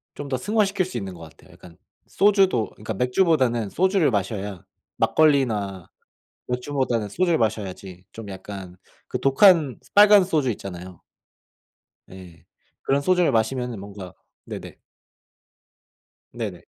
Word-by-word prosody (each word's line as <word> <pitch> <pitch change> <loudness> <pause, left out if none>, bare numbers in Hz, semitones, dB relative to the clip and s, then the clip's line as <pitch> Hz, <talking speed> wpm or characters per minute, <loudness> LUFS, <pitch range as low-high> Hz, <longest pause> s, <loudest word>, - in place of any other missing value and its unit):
좀 145 - -7
더 130 -2 -2
승화시킬 200 - 0
수 155 - -6
있는 95 -4 -5
것 85 - -13
같아요. 80 -1 -15
약간 85 -1 -16 0.3
소주도 195 - +2
그니까 105 - -6
맥주보다는 125 - +1
소주를 185 - +2
마셔야 100 -2 -3 0.3
막걸리나 110 - +1 0.6
맥주보다는 125 -3 -2
소주를 170 - +1
마셔야지 95 -4 -4
좀 110 -2 -9
약간 95 -1 -9 0.3
그 - - -4
독한 150 -1 +4
스 - - -25
빨간 205 -1 +7
소주 155 -8 0
있잖아요. 90 -4 -8 1.1
예. 90 -3 -13 0.4
그런 140 +1 +1
소주를 180 -2 +2
마시면은 120 +1 -1
뭔가 100 -2 -10 0.3
네네. - - -9 1.5
네네. 105 -7 -6
120 Hz, 285 characters per minute, -23 LUFS, 95-155 Hz, 1.5 s, 빨간